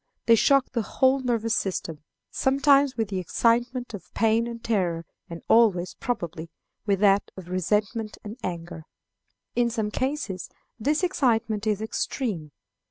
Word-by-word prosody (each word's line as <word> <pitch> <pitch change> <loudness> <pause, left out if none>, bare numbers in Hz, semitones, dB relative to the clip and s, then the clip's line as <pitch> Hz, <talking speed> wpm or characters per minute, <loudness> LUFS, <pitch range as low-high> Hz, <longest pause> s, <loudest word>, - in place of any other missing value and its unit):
They 230 - +6
shock 275 +4 +4
the 235 - 0
whole 260 +5 +2
nervous 230 -3 0
system, 170 -6 -2 0.3
sometimes 275 0 +3
with 220 -3 -1
the 190 -2 -2
excitement 240 +6 0
of 205 - -9
pain 225 +1 +2
and 235 -1 -7
terror, 175 -7 0 0.2
and 170 -1 -8
always, 200 -6 +4
probably, 170 -9 -4 0.4
with 200 -2 +2
that 200 -1 +4
of 180 -2 -9
resentment 210 +4 -1
and 210 +1 -7
anger. 170 -4 -6 0.7
In 240 -1 +2
some 220 -3 -2
cases 260 - -3 0.3
this 295 - +1
excitement 225 - +1
is 210 0 0
extreme. 210 - -3
220 Hz, 140 wpm, -26 LUFS, 190-245 Hz, 0.7 s, They